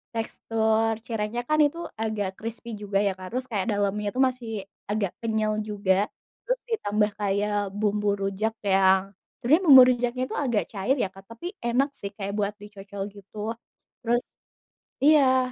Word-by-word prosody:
tekstur 225 0 0
cirengnya 225 +1 -2
kan 305 0 +3
itu 290 +4 -2 0.2
agak 215 -3 -1
krispi 230 +1 -6
juga 200 -1 -1
ya, 200 - +2
Kak, 185 0 -8
terus 255 +1 -2
kayak 205 0 -1
dalamnya 205 +1 0
itu 255 - -5
masih 250 -3 -5 0.4
agak 205 -4 0
kenyal 220 -2 0
juga, 200 -1 +1 0.4
terus - - +1
ditambah 210 - +1
kayak 205 +1 0 0.3
bumbu 210 0 +1
rujak 195 +3 -1
yang 190 -1 +4 0.4
sebenarnya 310 +10 +3
bumbu 265 -3 +11
rujaknya 245 +1 -1
itu - - -5
agak 235 -6 +1
cair 220 +7 +1
ya, - - 0
Kak, 195 0 -13
tapi 235 +9 -10 0.2
enak 265 +4 +2
sih 200 - -4
kayak 200 -1 -4
buat 205 0 0
dicocol, 200 -1 -9
gitu. 200 +1 -14 0.6
Terus 240 0 +1 0.8
iya. 260 -4 +5
215 Hz, 155 wpm, -26 LUFS, 200-245 Hz, 0.8 s, bumbu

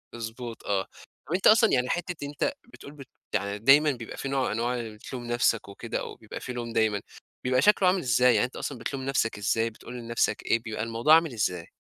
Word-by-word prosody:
مضبوط 115 0 -7
آه، 95 -1 0 0.4
طَب 165 - -2
أنت 185 - +3
أصلًا 225 0 +6
يعني 125 -1 +2
حتّة 175 -3 -3
أنت 145 - -1 0.2
بتقول 140 - -11
بت 140 -3 -12 0.3
يعني 100 0 -1
دايمًا 145 +6 +6
بيبقى 115 -3 -8
في 135 - -4
نوع 135 -1 +1
من - - -1
أنواع 120 +3 -1
اللي 110 -2 -6
بتلوم 120 +3 -8
نفْسك 120 -2 +1
وكده، 100 - -4
أو - - -7
بيبقى - - -9
في 125 - -6
لوم 120 -1 -5
دايمًا، 110 -3 +1 0.4
بيبقى 130 0 +2
شكله 200 +2 +5
عامل 185 +1 +3
إزاي؟ 125 -2 +4
يعني 105 - +3
أنت 125 - -9
أصلًا 140 - -4
بتلوم 130 +3 -4
نفْسك 135 -5 0
إزاي 115 +2 +1
بتقول 115 +2 -12
لنفْسك 115 0 -1
إيه، 115 - +2
بيبقى 110 -2 -5
الموضوع 115 +7 +4
عامل 165 -4 +2
إزاي؟ 90 -6 -2
120 Hz, 220 wpm, -27 LUFS, 115-140 Hz, 0.4 s, أصلًا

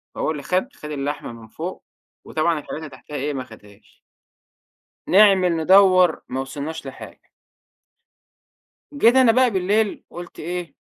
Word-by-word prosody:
فهو - - -1
اللي 145 -3 -6
خَد، 185 - -1
خَد 150 - -9
اللحمة 145 -2 -4
من 115 -1 -13
فوق 170 +10 -7 0.4
وطبعًا 160 0 0
الحاجات - - -7
اللي 155 - -8
تحتيها 140 +2 -12
إيه، 145 +1 -2
ما 130 - -4
آخُدهاش. 105 -3 -18 1.1
نعمل، 195 -3 +5
ندوّر، 185 0 +5
ما 130 - -3
وصلناش 145 +4 -6
لحاجة. - - -10 1.8
جيت 245 -3 +4
أنا 255 -3 +6
بقى 255 +1 +3
بالليل 205 +3 0
قُلت 175 0 -10
إيه، 175 +1 -5
170 Hz, 140 wpm, -22 LUFS, 145-190 Hz, 1.8 s, أنا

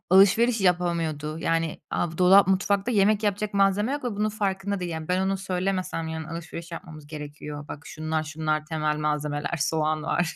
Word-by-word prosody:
alışveriş 215 +4 +5
yapamıyordu, 165 -4 0
yani, 165 -1 -1
a 170 - 0
bu 165 - -11
dolap 190 +2 +7
mutfakta 200 +4 +1
yemek 210 0 +3
yapacak 205 0 -1
malzeme 200 +4 +3
yok 290 -1 -3
ve 245 - -1
bunun 210 +1 +1
farkında 200 -2 -2
değil, 175 -1 -3
yani. 160 -1 -5
Ben 180 +1 +1
onu 195 0 0
söylemesem 185 -3 -2
yarın 160 0 -4
alışveriş 170 +1 -7
yapmamız 155 -3 -9
gerekiyor. 150 -1 -7
Bak 150 - -8
şunlar 155 -1 -2
şunlar 155 0 -2
temel 155 -1 -1
malzemeler, 150 +2 -1
soğan 155 +1 0
var 165 +1 0
170 Hz, 175 wpm, -26 LUFS, 155-195 Hz, -, dolap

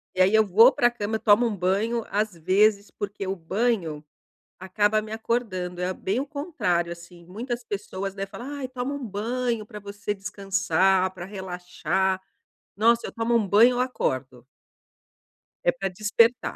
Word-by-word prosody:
e 185 - +2
aí 190 +3 +5
eu 220 0 +5
vou 225 +7 +7
pra 240 -2 +3
a - - +3
cama 220 -1 -2
eu - - -16
tomo 215 +3 +5
um 225 - 0
banho, 205 +5 0
às 210 0 0
vezes, 200 +4 +3
porque 200 -1 -5
o 190 - -1
banho 180 -3 -1 0.6
acaba 205 +3 +1
me 215 0 -8
acordando, 205 -6 -2
é 185 +1 0
bem 200 +7 -2
o 280 - -3
contrário 280 - -1
assim, 170 0 -11
muitas 240 +6 -5
pessoas, 195 -2 -5
né, 195 0 -3
fala: 195 +6 -9
"Ai, 260 - -2
toma 255 +2 -4
um 275 -4 -5
banho 230 +2 -2
pra 210 -2 -9
você 205 0 -5
descansar, 195 -2 +1
pra 180 -1 -8
relaxar". 190 0 -2 0.6
Nossa, 230 +3 +3
eu - - -8
tomo 230 +1 0
um 220 -4 +3
banho, 220 +6 +6
eu 245 - -1
acordo. 130 - -2 1.2
É - - +5
pra 195 -7 -3
despertar. 215 +5 +2
205 Hz, 170 wpm, -25 LUFS, 185-230 Hz, 1.2 s, vou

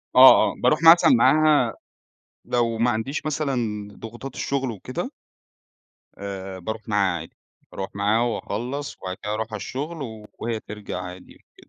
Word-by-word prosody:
آه، 130 +1 +11 0.2
آه - - -6
باروح 155 - +4
مثلًا 170 +9 +8
معاها 155 - +4 0.7
لو 115 -2 0
ما 120 +1 +3
عنديش 130 +7 -3
مثلًا 120 -9 -2
ضغوطات 120 +5 -9
الشغل 135 -2 -1
وكده، 130 - -5 1.1
آآ، 95 -1 -6
باروح 110 +4 -6
معاها 100 -4 +1
عادي، - - -12 0.4
باروح 95 0 -5
معاها 105 +3 +2
وأخلّص، 120 +4 -3
وبعد 95 0 -4
كده 105 - -3
أروح 110 0 -2
على - - -2
الشغل 135 -7 -6
وهي 115 -1 -3
ترجع 105 -3 -7
عادي 90 0 -10
وكده. - - -28
115 Hz, 145 wpm, -24 LUFS, 105-135 Hz, 1.1 s, آه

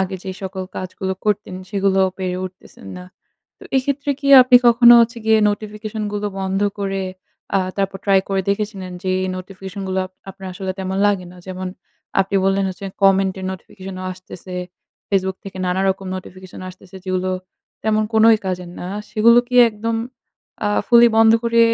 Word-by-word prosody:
আগে 190 0 -2
যে 190 - -4
সকল 190 0 -4
কাজগুলো 190 +1 -4
করতেন 210 -2 -1 0.2
সেগুলো 195 -1 +1 0.2
পেরে 180 -1 -2
উঠতেছেন 185 0 -11
না। 180 - -9 0.5
তো - - -18
এক্ষেত্রে 280 +2 -1
কি 280 - -4 0.2
আপনি 250 0 +7
কখনো 240 0 +8
হচ্ছে 235 +1 +1
গিয়ে 220 0 +5
নোটিফিকেশন 215 +1 -5
গুলো 210 0 -2
বন্ধ 190 0 -1 0.2
করে 195 -1 -2 0.5
আ - - +4 0.2
তারপর 195 -1 -1
ট্রাই 195 -1 +4
করে 195 -1 +1
দেখেছিলেন? 200 -3 -3
যে 190 - -3
এই 185 - -2
নোটিফিকেশন 190 +1 -8
গুলো 190 0 -1
আপ 185 - -22 0.2
আপনার 190 0 -9
আসলে 190 +1 -4
তেমন 190 0 -3
লাগে 195 -3 +1
না। 180 - -15
যেমন 185 0 -5 0.5
আপনি 195 +1 0
বললেন 195 0 +2
হচ্ছে 195 +2 -8 0.2
কমেন্ট 195 0 +4
এর - - -6
নোটিফিকেশনও 190 0 -9
আসতেছে। 185 0 -11 0.5
ফেসবুক 190 -1 0
থেকে 195 -1 -8
নানা 180 +1 0
রকম 190 0 -2
নোটিফিকেশন 185 0 -10
আসতেছে 185 +1 -13
যেগুলো 185 0 -1 0.5
তেমন 215 0 +2
কোনই 220 0 +6
কাজের 180 -1 -4
না। 180 - -5 0.2
সেগুলো 235 +2 +5
কি 250 - -5 0.2
একদম 225 +2 -3 0.7
আ - - +2 0.2
fully 235 0 +7
বন্ধ 225 0 +6
করে 235 0 +2
195 Hz, 170 wpm, -20 LUFS, 185-215 Hz, 0.7 s, কখনো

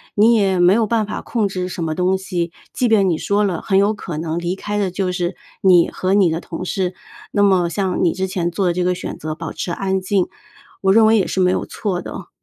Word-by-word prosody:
你 220 +3 +5
也 195 -4 +2
没 175 +2 +6
有 225 -1 +2
办 225 -1 +1
法 210 - -5
控 225 -4 -1
制 185 -1 -4
什 175 - -4
么 160 -1 -1
东 180 +3 +1
西， 180 -3 -3 0.2
即 250 - +1
便 210 -4 +4
你 165 -3 0
说 205 +1 +1
了， 185 -5 -1
很 190 - +1
有 200 +2 +3
可 175 -6 -6
能 160 +1 -2
离 175 +1 -2
开 205 +1 -3
的 195 -2 0
就 185 0 -2
是 180 0 -2 0.3
你 180 -3 +5
和 185 +1 0
你 190 -5 +4
的 165 +2 -2
同 175 +2 -6
事， 185 -1 -2 0.4
那 205 - +2
么 185 -4 +3
像 185 +2 -1
你 170 - +3
之 190 0 -2
前 180 -2 -2
做 185 +3 -1
的 175 - +2
这 180 - -1
个 180 0 +1
选 - - -6
择 155 0 -4
保 165 -1 -6
持 - - -4
安 190 +1 -1
静， 190 -1 +1 0.6
我 190 - +3
认 225 +1 +6
为 220 +1 +5
也 205 - +2
是 - - -2
没 180 -1 +4
有 - - -2
错 185 -4 -3
的。 - - -8
185 Hz, 275 characters per minute, -19 LUFS, 175-200 Hz, 0.6 s, 没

